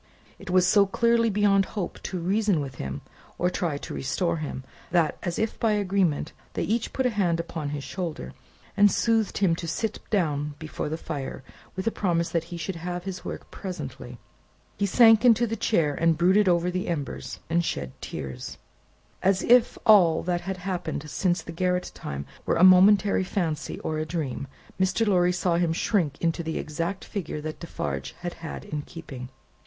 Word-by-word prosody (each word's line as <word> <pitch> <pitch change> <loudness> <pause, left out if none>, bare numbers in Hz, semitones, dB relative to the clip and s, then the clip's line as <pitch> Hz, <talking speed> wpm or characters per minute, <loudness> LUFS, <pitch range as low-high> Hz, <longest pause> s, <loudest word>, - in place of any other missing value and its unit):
It - - -10
was 180 0 +4
so 200 +2 +5
clearly 230 +2 +3
beyond 200 -1 +3
hope 185 - -3
to 185 - -3
reason 195 +1 +1
with 140 -2 -4
him, 70 +1 -5 0.4
or 180 +1 +1
try 165 -6 -1
to - - -7
restore 170 +5 -1
him, 145 -4 -5 0.3
that 170 -3 +2
as 175 -1 -3
if 220 0 -1
by 225 -2 +2
agreement 190 -7 0 0.2
they - - -1
each 225 +2 -1
put 265 - -1
a 250 - +3
hand 180 -6 +1
upon 165 -3 -4
his 145 -1 -4
shoulder, 160 - -5 0.4
and 205 0 +6
soothed 225 -2 +1
him 185 -4 +3
to 165 - -5
sit 215 +6 -2
down 150 -7 0
before 155 -1 -5
the 160 - -2
fire, 140 -5 -5 0.3
with 190 - -4
a 225 - +2
promise 170 -5 0
that 165 -1 -1
he 170 0 -7
should 170 +2 -4
have 175 +1 -4
his 190 -2 -6
work - - -7
presently. 135 -9 -7 0.6
He 200 - 0
sank 225 +1 +6
into 240 -1 +5
the 225 0 -2
chair, 165 -9 +1
and 165 +1 +2
brooded 190 +4 +4
over 175 0 +2
the 185 +1 -2
embers, 155 -5 -4
and 170 +1 +1
shed 70 - -3
tears. 65 -1 -6 0.6
As 190 0 +2
if 245 0 +5
all 180 -7 +6
that 175 0 -1
had 190 +1 -4
happened 175 -5 -4
since 180 -2 0
the - - -7
garret 180 +1 -1
time 70 0 -6 0.2
were - - +2
a 170 - +3
momentary 195 +2 +6
fancy, 175 -5 -2
or 155 -1 -2
a 155 - -1
dream, 150 -5 -3 0.3
Mr. 190 +4 +2
Lorry 180 -3 +3
saw 175 -1 +1
him 170 -2 +1
shrink 165 -6 0
into 170 0 0
the 160 -1 -3
exact 170 +5 -3
figure 170 -6 -4
that 155 0 -6
Defarge 70 - -4
had 175 -1 -4
had 160 - -6
in 150 -1 -4
keeping. 140 -6 -9
175 Hz, 185 wpm, -26 LUFS, 155-195 Hz, 0.6 s, and